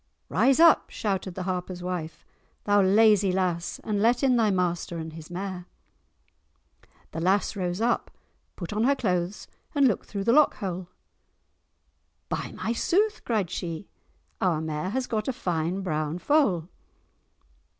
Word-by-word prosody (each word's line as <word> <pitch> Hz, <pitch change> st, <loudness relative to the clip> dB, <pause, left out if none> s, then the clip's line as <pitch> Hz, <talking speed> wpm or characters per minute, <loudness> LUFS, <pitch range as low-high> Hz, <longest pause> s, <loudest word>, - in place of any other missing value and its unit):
"Rise 270 Hz, +2 st, +3 dB
up," 335 Hz, -1 st, +6 dB
shouted 190 Hz, -4 st, -3 dB
the 185 Hz, -, -4 dB
Harper's 180 Hz, -1 st, -4 dB
wife, 180 Hz, -3 st, -5 dB, 0.4 s
"thou 205 Hz, 0 st, +4 dB
lazy 205 Hz, 0 st, +5 dB
lass, 180 Hz, -2 st, -1 dB
and 205 Hz, -2 st, -1 dB
let 240 Hz, +4 st, +3 dB
in 260 Hz, -2 st, +4 dB
thy 225 Hz, -3 st, +3 dB
master 175 Hz, -2 st, -1 dB
and 160 Hz, -1 st, -6 dB
his 160 Hz, -1 st, -10 dB
mare." 180 Hz, 0 st, -5 dB, 1.4 s
The 165 Hz, -, -4 dB
lass 195 Hz, +5 st, +1 dB
rose 180 Hz, 0 st, -2 dB
up, 235 Hz, +1 st, +1 dB, 0.5 s
put 175 Hz, +1 st, -6 dB
on 215 Hz, +2 st, +1 dB
her 280 Hz, +2 st, +4 dB
clothes 180 Hz, -5 st, -2 dB, 0.3 s
and 280 Hz, -2 st, +5 dB
looked 220 Hz, -, -1 dB
through 200 Hz, -2 st, -4 dB
the 230 Hz, -, +3 dB
lock 300 Hz, +1 st, +5 dB
hole. 185 Hz, -2 st, -4 dB, 1.4 s
"By -, -, -3 dB
my 230 Hz, -, -2 dB
sooth," 410 Hz, -, +1 dB
cried 210 Hz, -7 st, 0 dB
she, 175 Hz, 0 st, -5 dB, 0.5 s
"our 175 Hz, -4 st, +2 dB
mare 155 Hz, +2 st, -3 dB
has 255 Hz, +5 st, -1 dB
got 215 Hz, -3 st, -2 dB
a -, -, +2 dB
fine 175 Hz, -4 st, -2 dB
brown 155 Hz, -3 st, -2 dB
foal!" 190 Hz, -, +2 dB
190 Hz, 150 wpm, -26 LUFS, 175-225 Hz, 1.4 s, up